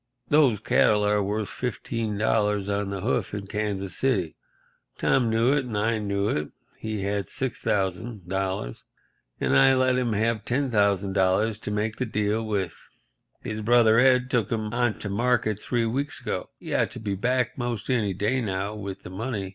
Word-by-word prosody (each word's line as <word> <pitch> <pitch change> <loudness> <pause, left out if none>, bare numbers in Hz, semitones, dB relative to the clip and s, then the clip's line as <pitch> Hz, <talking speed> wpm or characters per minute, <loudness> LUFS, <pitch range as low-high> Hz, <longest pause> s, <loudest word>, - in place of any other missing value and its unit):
Those 140 -8 +4
cattle 105 -1 +3
are 105 0 +2
worth 105 +1 -1
$15 105 -4 -1
on 100 - -4
the 100 -1 -4
hoof 110 -2 -1
in 100 -1 -5
Kansas 100 -2 -3
City. 100 -12 0 0.6
Tom 120 -3 +2
knew 115 +4 +3
it 145 -3 +1
and 115 -4 -4
I 110 +2 +1
knew 100 -1 -1
it. 75 -7 -1 0.3
He 110 -3 -3
had 100 -2 -1
$6,000, 95 - -2 0.6
and - - +1
I 135 - +6
let 130 0 +3
him 120 -3 0
have 110 0 0
the 120 - -2
$10,000 100 -4 +1
to - - -5
make 105 +1 -1
the 130 - -2
deal 105 +1 0
with. 100 -6 -2 0.7
His 110 0 -4
brother 115 0 +5
Ed 125 0 +4
took 115 -5 +1
'em 110 -1 -2
on 120 -2 +1
to 105 - -3
market 115 -1 +1
three 120 -2 0
weeks 135 +5 -2
ago. - - -4
He - - -7
ought - - +2
to - - -8
be 105 -2 -2
back 125 +4 0
'most 120 -1 -3
any 105 -6 +1
day 105 +7 0
now 100 -1 -2
with 100 -3 -7
the 90 - -9
money. 100 -1 -3
105 Hz, 170 wpm, -26 LUFS, 100-120 Hz, 0.7 s, I